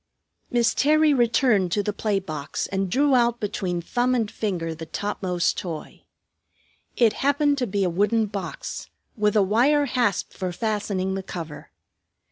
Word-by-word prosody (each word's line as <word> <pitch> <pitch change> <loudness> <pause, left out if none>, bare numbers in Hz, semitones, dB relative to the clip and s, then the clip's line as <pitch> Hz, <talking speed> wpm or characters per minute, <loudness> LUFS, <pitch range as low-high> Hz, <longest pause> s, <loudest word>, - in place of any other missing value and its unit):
Miss 235 -2 +2
Terry 305 +1 +4
returned 235 -6 +3
to 205 - +1
the 210 - -2
play 210 -1 0
box 155 -6 -4
and 195 -1 -2
drew 280 +7 +2
out 240 -1 +3
between 180 -4 -2
thumb 245 +6 +1
and 225 -4 -1
finger 175 -6 -2
the 160 0 -8
topmost 185 -4 -1
toy. 165 -4 -7 0.9
It 230 -3 +4
happened 285 +1 +2
to 250 - 0
be 200 0 0
a - - +2
wooden 210 +5 +2
box, 195 -3 -6 0.3
with 210 -2 +1
a 210 - +5
wire 260 +9 +3
hasp 245 -7 0
for 185 -1 -3
fastening 200 -2 -2
the 195 - -2
cover. 165 -5 -8
210 Hz, 155 wpm, -24 LUFS, 185-245 Hz, 0.9 s, a